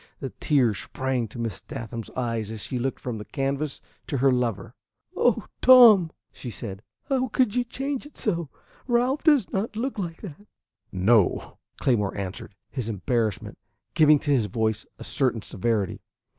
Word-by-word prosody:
The 135 - -5
tears 125 - +2
sprang 130 -3 -2
to 110 - -12
Miss 115 -5 -4
Sathman's 115 -5 -7
eyes 115 -4 -2
as 110 -1 -6
she 125 +7 -3
looked 130 +2 -2
from 120 -3 -5
the 105 - -7
canvas 140 +2 -2 0.3
to 140 - -1
her 135 +1 +4
lover. 125 -4 -1 0.4
"Oh, - - +2 0.2
Tom," 230 -9 +8 0.2
she 125 - -7
said, 100 -2 -7 0.2
"how 260 -1 0
could 240 -2 +1
you 245 - +2
change 270 +3 -4
it 295 - -16
so? 170 -4 -1 0.4
Ralph 250 +3 +1
does 290 - +3
not 210 +2 -2
look 240 +1 -3
like 170 -1 -5
that." 200 +2 -10 0.4
"No," 95 +2 +2 0.2
Claymore 105 -7 +1
answered, 100 +1 -6 0.2
his 125 -5 -3
embarrassment 110 +1 -2 0.3
giving 155 -1 +6
to 145 +1 -2
his 120 -7 +2
voice 110 +1 -1
a - - -9
certain 125 -5 0
severity. 105 -1 -1
130 Hz, 160 wpm, -25 LUFS, -, 0.4 s, Tom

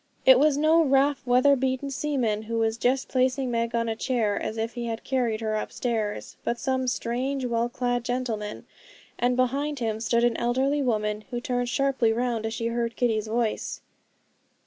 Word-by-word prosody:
It 260 -1 +8
was 295 0 +4
no 315 +2 +4
rough, 275 -1 +2
weather 255 +3 +5
beaten 265 +1 -1
seaman, 255 -7 -1
who 230 +1 -4
was 225 0 +1
just 255 +2 +1
placing 255 0 +1
Meg 230 0 -1
on 230 0 0
a 225 - -1
chair, 225 -4 0
as 220 - -3
if 225 +1 -2
he 240 -1 -4
had 225 -1 -4
carried 240 -5 0
her 215 -1 -1
upstairs; 215 -1 -3
but 235 - -1
some 260 0 -1
strange, 255 +3 -1
well 235 0 0
clad 245 0 -1
gentleman, 235 -4 -3 0.5
and 245 +1 +2
behind 275 +4 0
him 220 -3 -2
stood 235 +1 +1
an 240 -1 +2
elderly 265 +4 +1
woman, 215 -4 -1
who 240 -2 -3
turned 245 -1 -2
sharply 265 -2 +2
round 230 -1 -1
as 220 - -4
she 230 - -3
heard 235 0 -2
Kitty's 220 -4 0
voice. 225 0 -2
245 Hz, 180 wpm, -26 LUFS, 225-260 Hz, 0.5 s, It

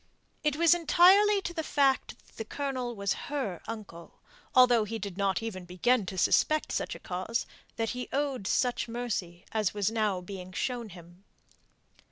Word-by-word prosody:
It 300 -2 +1
was 335 +2 +5
entirely 380 +5 +5
to 345 - -4
the 330 - -2
fact 275 -3 0
that - - -24
the - - -3
Colonel 255 0 -3
was 200 -1 0 0.2
her 260 - -3
uncle, 205 -7 -9 0.4
although 245 -3 +6
he 225 +2 -4
did 200 -4 -6
not 195 +1 0
even 195 -5 -5
begin 190 +5 +1
to 190 - -5
suspect 310 +10 +2
such - - -2
a - - -10
cause, 185 +6 -3 0.3
that 225 0 -1
he 250 0 -5
owed 270 -7 -1
such 250 +1 +1
mercy 210 -7 -4
as 215 -3 0
was 205 +1 0
now 215 -4 0
being 185 0 -9
shown 240 +1 -3
him. 175 +1 -14
225 Hz, 170 wpm, -29 LUFS, 190-270 Hz, 0.4 s, although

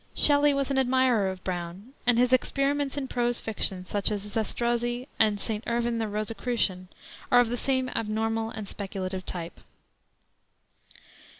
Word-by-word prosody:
Shelley 290 0 +5
was 275 -1 0
an 270 - +2
admirer 255 -6 +3
of 190 -1 -7
Brown, 180 +6 -5
and 245 -1 +5
his 250 +1 +3
experiments 275 +2 +1
in 275 -2 -2
prose 240 -1 0
fiction, 195 -4 -1
such 200 +1 0
as 205 -2 -2
Zastrozzi 240 +4 -1
and 215 -2 +3
St. 215 +1 -1
Irvyne 235 0 0
the 220 - -1
Rosicrucian, 210 -3 -2 0.4
are 245 - +7
of 245 -2 +4
the 245 - -1
same 260 +1 0
abnormal 225 0 -1
and 215 -2 -6
speculative 190 -2 -5
type. 170 -1 -5
225 Hz, 145 wpm, -27 LUFS, 205-250 Hz, 0.4 s, are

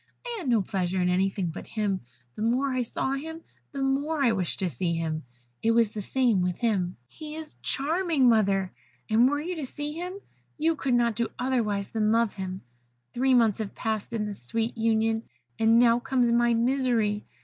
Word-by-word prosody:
I 480 -1 -4
had 315 -9 -3
no 225 -4 +3
pleasure 185 -1 -1
in 180 0 +2
anything 190 -1 0
but 160 - -8
him: 205 -3 -1 0.3
the - - -8
more 255 +5 +1
I 255 - +1
saw 245 +2 -2
him 320 +4 -5 0.3
the 275 -1 -3
more 280 +3 0
I 240 - +4
wished 190 -6 -1
to 190 - 0
see 170 +3 -1
him. 160 -1 -2 0.4
It 225 +1 +3
was 230 -2 +3
the 215 - -5
same 235 -2 +2
with 180 -1 -1
him. 195 -7 0
He 305 - -9
is 315 -1 -7
charming, 315 -1 +1
mother! 195 -5 +3 0.4
and 235 +4 +5
were 290 +1 0
you 350 +4 -3
to 300 - -3
see 295 +3 -5
him 355 +3 -5 0.4
you 320 +2 +2
could 265 -4 0
not 235 -2 +2
do 235 +1 0
otherwise 225 -6 0
than 215 -1 +1
love 230 -1 +2
him. 190 -1 -5 0.5
"Three 260 +1 +3
months 230 -4 +3
have 215 -3 -4
passed 220 0 -2
in 220 -2 -1
this 205 -2 -6
sweet 225 - -2
union, 225 0 +1 0.4
and 225 +1 +5
now 235 0 +5
comes 245 -1 +1
my 235 0 +3
misery. 235 -4 +1
230 Hz, 195 wpm, -27 LUFS, 205-265 Hz, 0.5 s, and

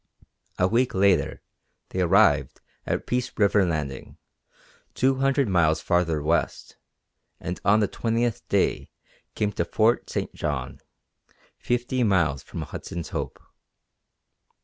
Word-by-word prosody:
A 90 - +3
week 120 +4 +1
later 95 -6 +2 0.5
they 95 - -2
arrived 85 -2 +3 0.3
at - - -1
Peace 125 0 -1
River 100 -1 +4
landing, 75 -5 -4 0.8
two 130 +1 +2
hundred 135 0 +2
miles 80 -5 +2
farther 85 -3 0
west, 80 -3 -1 0.6
and 90 +1 -5
on 105 +2 +4
the 105 - +2
twentieth 115 +1 -1
day - - +1 0.5
came 105 -1 0
to 95 - -1
Fort 110 +7 +1
St. - - -3
John, 70 -4 -4 0.8
fifty 125 +1 -1
miles 85 - +2
from - - -7
Hudson's 85 -2 -7
Hope. - - -5
95 Hz, 120 wpm, -25 LUFS, 80-120 Hz, 0.8 s, River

